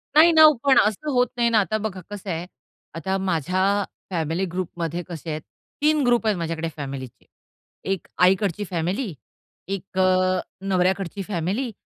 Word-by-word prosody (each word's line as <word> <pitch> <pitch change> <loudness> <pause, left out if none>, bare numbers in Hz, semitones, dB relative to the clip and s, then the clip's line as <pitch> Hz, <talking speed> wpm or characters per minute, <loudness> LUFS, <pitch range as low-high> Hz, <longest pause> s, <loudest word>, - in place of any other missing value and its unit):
नाही 330 +2 +8
ना 315 0 +8
ओ, 305 - +8
पण 275 -2 +5
असं 215 +9 +1
होत 250 -1 +3
नाही 235 -1 +3
ना, 225 - +4
आता 215 +2 0
बघा 205 -4 -4
कसं 200 -1 -7
आहे, 170 +1 -3 0.5
आता 190 +4 -1
माझ्या 185 0 0 0.5
फॅमिली 165 +2 -1
ग्रुपमध्ये 175 -1 -3
कसे 165 -1 -7
आहेत. 155 0 -3 0.4
3 305 0 +3
ग्रुप 240 -1 +3
आहेत 205 -4 +2
माझ्याकडे 165 -1 -3
फॅमिलीचे. 135 -3 -7 0.7
1 190 -4 -3 0.2
आईकडची 195 +1 +3
फॅमिली, 180 +5 -2 0.5
1 195 -1 -6
अ, 185 0 +3 0.2
नवऱ्याकडची 190 0 0
फॅमिली 205 +7 -2
185 Hz, 150 wpm, -23 LUFS, 170-215 Hz, 0.7 s, नाही